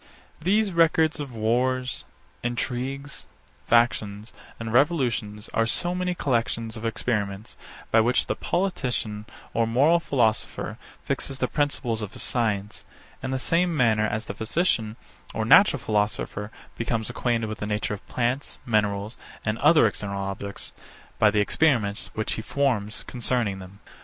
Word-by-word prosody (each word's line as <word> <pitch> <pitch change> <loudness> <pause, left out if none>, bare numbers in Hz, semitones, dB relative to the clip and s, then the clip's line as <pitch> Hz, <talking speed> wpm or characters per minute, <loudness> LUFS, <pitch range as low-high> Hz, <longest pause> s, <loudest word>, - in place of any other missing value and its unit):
These 200 +4 +2
records 160 -2 +3
of 145 -3 -5
wars, 125 +3 0 0.4
intrigues, 130 +3 -3 0.4
factions, 110 -3 +2 0.3
and 115 -1 -4
revolutions, 120 -7 +1
are 115 0 +2
so 175 +8 0
many 180 0 -1
collections 115 -5 -1
of 110 +1 -3
experiments, 105 -2 -2 0.4
by 115 - +6
which 120 +3 +3
the - - -1
politician 125 - -2 0.3
or 115 0 +2
moral 140 +9 +4
philosopher 110 - 0 0.2
fixes 135 - -2
the 130 - 0
principles 125 -6 -1
of 105 - -5
his - - -5
science, 105 -4 -1 0.4
in 130 - -3
the 130 - 0
same 165 +4 +1
manner 110 -4 +3
as 110 +1 -3
the - - -5
physician 110 -3 0 0.4
or 110 - 0
natural 195 - +7
philosopher 105 -1 -1 0.3
becomes 115 -1 -1
acquainted 115 -2 0
with 110 0 -5
the 105 - -3
nature 105 0 -1
of 105 - -7
plants, 125 +3 -1
minerals, 105 -1 0 0.3
and 110 +1 -1
other 160 -7 +6
external 100 -2 -2
objects, 100 +1 -5 0.5
by 105 - +6
the 105 0 +2
experiments 105 -4 +1
which 110 - -1
he - - -3
forms 110 -6 -1
concerning 120 -5 -1
them. 95 +1 -11
115 Hz, 140 wpm, -25 LUFS, 105-135 Hz, 0.5 s, natural